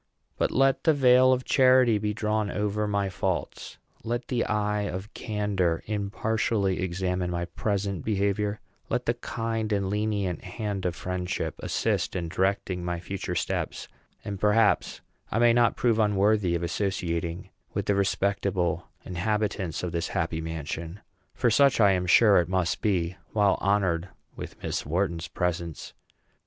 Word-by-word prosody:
But - - +1
let 135 0 +2
the 160 -2 +5
veil 130 -1 +6
of 130 0 +1
charity 130 -4 +5
be 105 0 -1
drawn 105 -1 -1
over 105 +1 -1
my 100 -1 0
faults; 95 -1 -3 0.3
let 120 +1 -3
the 125 -2 +1
eye 105 -1 0
of 95 +4 -6
candor 100 -6 -1
impartially 105 -1 -1
examine 90 0 -1
my 85 0 -2
present 100 0 -2
behavior; 100 0 0 0.3
let 125 +1 -1
the 115 - +2
kind 115 -2 -3
and 100 -2 0
lenient 105 -4 -1
hand 100 -4 -3
of 90 - -3
friendship 90 0 -3
assist - - -1
in 85 -3 -2
directing 95 0 -1
my 85 -1 -2
future 95 +2 -4
steps; - - -2 0.4
and 100 -2 -4
perhaps 105 +1 +2 0.3
I - - 0
may 120 0 +5
not 120 -1 +3
prove 115 -2 +2
unworthy 105 -3 +2
of 85 - -2
associating 85 -2 -2 0.2
with - - -1
the 100 - +2
respectable 95 -3 0 0.2
inhabitants 95 -2 -2
of 90 - -2
this 85 0 -2
happy 80 -1 -2
mansion; 80 +3 -5 0.3
for 120 -2 +2
such 140 +3 +4
I 100 -3 +6
am 90 -1 0
sure 105 +3 +6
it 85 0 +2
must 90 -3 0
be 90 -5 0 0.2
while 100 -2 +3
honored 95 -3 +1 0.3
with - - -9
Miss - - -2
Wharton's 85 +1 -1
presence. 85 -1 -3
100 Hz, 150 wpm, -27 LUFS, 90-110 Hz, 0.4 s, veil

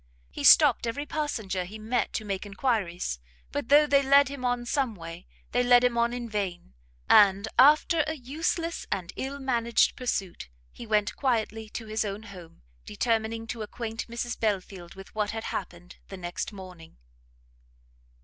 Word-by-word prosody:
He - - -6
stopt - - +6
every 285 +6 -3
passenger 220 -12 -3
he 200 +5 -9
met 220 +1 -1
to 215 - -3
make 195 -2 -3
enquiries, 195 - -2 0.3
but 230 - -4
though 295 +2 +7
they 280 -1 +4
led 280 0 +5
him 275 -2 -7
on 245 -1 -1
some 255 -3 -1
way, 165 0 -10 0.2
they 245 - +2
led 245 0 +5
him 245 -1 +2
on 235 0 +2
in 245 -1 -5
vain; 195 - -4 0.3
and, 200 0 +5
after 305 +3 +5
a 315 - -2
useless 325 +5 -3
and 180 -1 -3
ill 270 +2 -4
managed 235 -4 +1
pursuit, 195 - -3 0.2
he 235 - -10
went 210 0 +1
quietly 225 -4 -1
to 225 - -7
his 215 +1 -1
own 205 +1 -5
home, 180 - -13 0.2
determining 225 - -1
to 225 0 -6
acquaint 225 +1 -5
Mrs 235 0 -4
Belfield 190 -4 -3
with 195 0 -12
what 210 -1 -1
had 225 0 -4
happened 175 -1 -6
the 195 - -8
next 175 +2 -5
morning. 185 -5 -12
225 Hz, 165 wpm, -27 LUFS, 195-245 Hz, 0.3 s, though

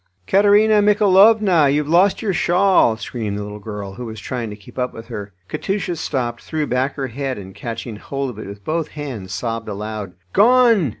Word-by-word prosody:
"Katerina 205 - +4
Michaelovna, 205 -5 +5
you've 145 +1 +1
lost 185 +7 +3
your 200 -3 0
shawl!" 180 - +3
screamed 110 -3 -4
the 105 - -4
little 105 0 -8
girl, 105 -2 -7
who 120 +4 -7
was 110 -1 -7
trying 120 +1 -4
to 105 - -7
keep 105 +4 -12
up 125 0 -2
with 115 +1 -10
her. 105 -3 -6 0.2
Katusha 195 - -2
stopped, 120 -7 -3
threw 155 -2 -2
back 130 +1 -1
her 135 -2 -3
head, 135 +2 -4
and 95 -1 -9
catching 115 0 -6
hold 135 +4 -4
of 110 - -11
it - - -7
with 100 0 -10
both 160 0 -1
hands 120 -11 -6
sobbed 115 +2 -4
aloud. 105 -2 -5 0.2
"Gone!" 230 - +5
130 Hz, 190 wpm, -20 LUFS, -, 0.2 s, Michaelovna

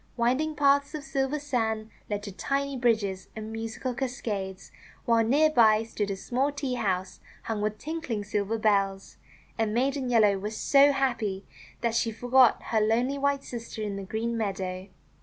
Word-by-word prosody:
Winding 260 +7 +1
paths 280 +1 +3
of 300 - -5
silver 275 +1 -1
sand 225 -6 -2 0.2
led 205 -1 -2
to 205 - -6
tiny 275 +7 -2
bridges 220 -6 0
and 220 0 -6
musical 225 +3 -4
cascades, 215 -7 -4 0.3
while 230 -1 +4
near 295 +7 +4
by 220 -5 +5
stood 210 -2 -3
a 195 - -1
small 255 +8 -1
tea 280 -3 -3
house 190 -5 -2 0.2
hung 220 -2 -3
with 210 0 -1
tinkling 285 -7 -4
silver 210 +1 -1
bells. 195 -3 0 0.4
And 220 -1 0
Maiden 265 +1 0
Yellow 210 -5 +4
was 210 +2 -5
so 280 0 +5
happy 235 -8 -1 0.4
that 235 -1 0
she 230 0 +1
forgot 245 +2 +4
her 220 -2 +2
lonely 240 +6 +1
white 280 0 +1
sister 230 -2 -6
in 205 -1 -3
the 200 - -5
green 220 +4 -3
meadow. 190 -3 -3
225 Hz, 165 wpm, -27 LUFS, 210-270 Hz, 0.4 s, by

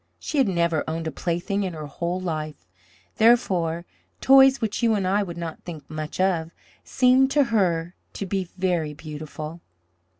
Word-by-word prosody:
She 300 - -2
had 265 - +4
never 170 -4 +1
owned 160 +1 -3
a 160 - -2
plaything 175 +5 -2
in 185 -3 -2
her 155 -2 -6
whole 170 +5 -3
life; 155 - -4 0.5
therefore, 180 -8 +3 0.3
toys 270 0 +6
which 220 -1 -2
you 230 -2 +3
and 195 -2 -1
I 200 +3 +2
would 175 -4 -5
not 165 -2 -6
think 160 -4 -9
much 155 +1 -5
of, 175 -4 +1 0.3
seemed 260 +1 +4
to 290 0 +5
her 175 -4 +1 0.2
to 200 - -4
be 190 -2 -2
very 175 -5 -1
beautiful. 155 +1 -8
175 Hz, 165 wpm, -24 LUFS, 160-205 Hz, 0.5 s, toys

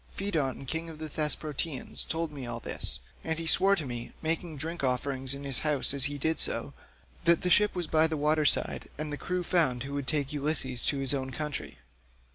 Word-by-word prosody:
Pheidon 155 -9 -2
king 160 +5 -2
of 160 - -9
the 155 0 -5
Thesprotians 150 -1 -1
told 165 -1 -3
me 135 -4 -7
all 120 -1 -4
this, 65 - -1 0.2
and 160 0 -2
he 165 - -4
swore 195 +4 +4
to 160 - -4
me—making 155 +7 -3
drink 165 +2 -4
offerings 130 +1 0
in 140 - -8
his 135 -3 +2
house 150 -3 +3
as 140 -1 +5
he 145 0 -2
did 160 +3 0
so—that 170 -1 -1
the 180 - +1
ship 210 +1 +4
was 175 -1 -1
by 160 +1 +3
the 160 -1 -3
water 150 +2 +2
side 145 - +1
and 150 0 -4
the - - -1
crew 180 +3 -2
found 150 -9 +1
who 140 +1 -6
would 140 -2 -3
take 145 -2 +2
Ulysses 140 -4 +2
to 145 - +2
his 135 0 +4
own 130 -1 -2
country. 150 +2 -5
150 Hz, 205 wpm, -29 LUFS, 135-160 Hz, 0.2 s, as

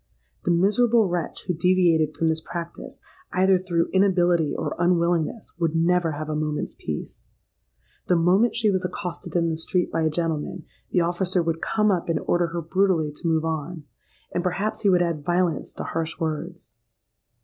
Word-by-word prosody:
The - - 0
miserable 210 +6 +3
wretch 175 -2 -3
who 180 - 0
deviated 170 -3 +2
from 165 - 0
this 160 0 +1
practice, 170 +1 -7 0.3
either 190 0 +4
through 175 -2 -1
inability 175 -4 +3
or - - -2
unwillingness, 175 +2 0
would 165 -2 0
never 170 0 +2
have 155 +1 -5
a 155 - -2
moment's 150 0 -2
peace. - - -7 0.8
The 180 - +3
moment 185 +8 +3
she 220 -3 +2
was 185 -1 0
accosted 180 -1 -5
in 170 -1 +2
the 160 - -2
street 180 +2 0
by 165 - 0
a 160 - +2
gentleman, 165 +1 -3 0.2
the 180 - +2
officer 175 +1 0
would 165 0 -2
come 215 -1 +2
up 175 -3 -1
and 165 - +1
order 175 0 +1
her 170 0 -4
brutally 175 -3 +1
to 150 +3 -6
move 160 -1 +1
on; 160 +1 -3 0.5
and 175 - -1
perhaps 195 +4 -2
he 200 - +3
would 180 -2 +4
add 165 -4 -2
violence 175 -1 0
to - - -5
harsh 165 +1 -3
words. 160 -5 -5
175 Hz, 175 wpm, -24 LUFS, 160-185 Hz, 0.8 s, either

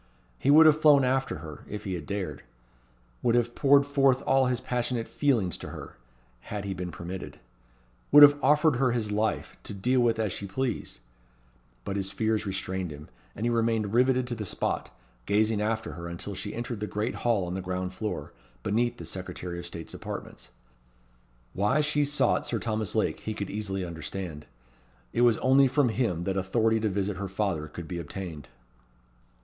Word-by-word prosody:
He 135 - 0
would 155 +3 +8
have 155 0 +5
flown 145 -3 +7
after 130 -4 +1
her, 75 -2 -9
if 105 - -5
he 95 - -3
had 85 -5 -5
dared; 100 -2 -4 0.8
would 120 -1 +2
have 120 0 +1
poured 140 +1 +5
forth 135 -2 +3
all 135 -1 +4
his 125 -2 0
passionate 120 -1 -2
feelings 115 - +1
to - - -8
her, - - -9 0.4
had 100 +10 -6
he 100 - -2
been 90 -1 -5
permitted; 85 +2 -7 0.7
would 145 +1 +10
have 145 0 +7
offered 150 -2 +4
her 125 -2 +2
his 110 -3 -1
life, 105 +2 -1
to 105 - -7
deal 125 +7 +1
with 115 -2 +3
as 110 -3 0
she 100 - -5
pleased; 125 - -3 0.8
but 100 - -2
his 95 0 -1
fears 110 +1 0
restrained 95 -1 -3
him, 75 -1 -10 0.3
and 110 - -3
he 120 - +2
remained 115 -3 +1
riveted 130 +1 +3
to 125 - -4
the 110 -2 -4
spot, 100 - -2 0.4
gazing 105 +1 +2
after 110 +1 -1
her 85 0 -7
until 85 +4 -5
she 100 +2 -5
entered 120 -1 -4
the 105 - -3
great 105 +4 -2
hall 115 -6 +2
on 90 - -4
the 95 - -3
ground 90 0 -3
floor, 95 -8 -4 0.3
beneath 120 +4 0
the - - -8
Secretary 90 -1 -6
of 85 - -6
State's 85 -1 -8
apartments. - - -7 1.0
Why 105 +9 +2
she 145 0 +2
sought 145 +1 +1
Sir 120 - 0
Thomas 110 -2 -2
Lake - - +1
he 110 - -5
could 100 -2 -4
easily 95 -3 -3
understand. 85 -2 -6 0.7
It - - +1
was 120 -3 +5
only 135 +1 +5
from 130 0 +2
him 110 -8 0
that 95 +1 -1
authority 110 +4 +2
to 110 -1 0
visit 100 0 -2
her 100 0 -4
father 95 -6 -1
could 80 +2 -8
be 85 0 -4
obtained. 85 -4 -7
105 Hz, 185 wpm, -28 LUFS, 95-125 Hz, 1.0 s, would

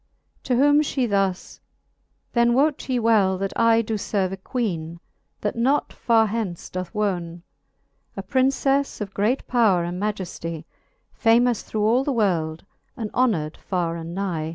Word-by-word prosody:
To 255 - +1
whom 290 +3 +5
fhe 270 -4 -1
thus; 195 -3 -1 0.7
Then 235 0 +3
wote 280 +1 +1
ye 255 - +1
well, 215 -5 +3
that 195 +1 -3
I 230 0 +4
Doe 220 0 -2
ferve 195 -2 -1
a 195 - -5
0^eene,_that 185 -2 -5
not 260 +5 +1
far 225 -2 +3
hence 210 -5 -4
doth 185 -1 -5
wone, 175 -5 -2 0.7
A 195 - -4
PrincefTe 270 +4 +1
oiT 195 - -21
great 220 +7 0
powre 205 -9 +3
and 180 +2 -5
majeftie, 175 -6 -4 0.5
Famous 235 0 +3
through 215 -1 -3
all 235 +5 +3
the 280 - -1
world, 170 -8 0 0.3
and 220 -4 -4
honor'd 185 -12 +1
far 175 -3 -2
and 165 +1 -7
nie. 175 -5 -2
210 Hz, 150 wpm, -23 LUFS, 180-240 Hz, 0.7 s, whom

